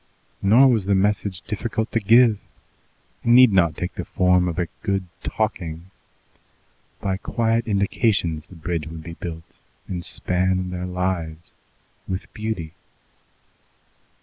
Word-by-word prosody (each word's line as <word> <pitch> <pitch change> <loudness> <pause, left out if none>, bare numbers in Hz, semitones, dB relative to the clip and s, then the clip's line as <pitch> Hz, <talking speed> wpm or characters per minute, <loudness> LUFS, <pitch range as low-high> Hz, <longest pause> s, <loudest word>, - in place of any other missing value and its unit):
Nor 115 +7 +6
was 115 -7 +2
the 100 0 +2
message 100 -1 0
difficult 110 +1 -3
to 115 - +1
give. 115 0 +5 0.8
It - - -7
need 125 0 +7
not 85 -5 +3
take 90 - -3
the - - -5
form 90 -1 +2
of 85 - -3
a 90 - +1 0.2
good 100 -3 -1 0.2
"talking." 90 -5 -3 1.1
By 95 -1 -1
quiet 115 +2 0
indications 100 -6 0
the 95 - -14
bridge 80 -1 -3
would 80 0 -8
be 85 +1 -8
built 85 -2 -8 0.3
and 90 -2 -4
span 90 +1 0
their 90 0 -4
lives 90 -3 -3 0.5
with 95 +1 -5
beauty. 105 -8 -4
95 Hz, 130 wpm, -23 LUFS, 85-110 Hz, 1.1 s, need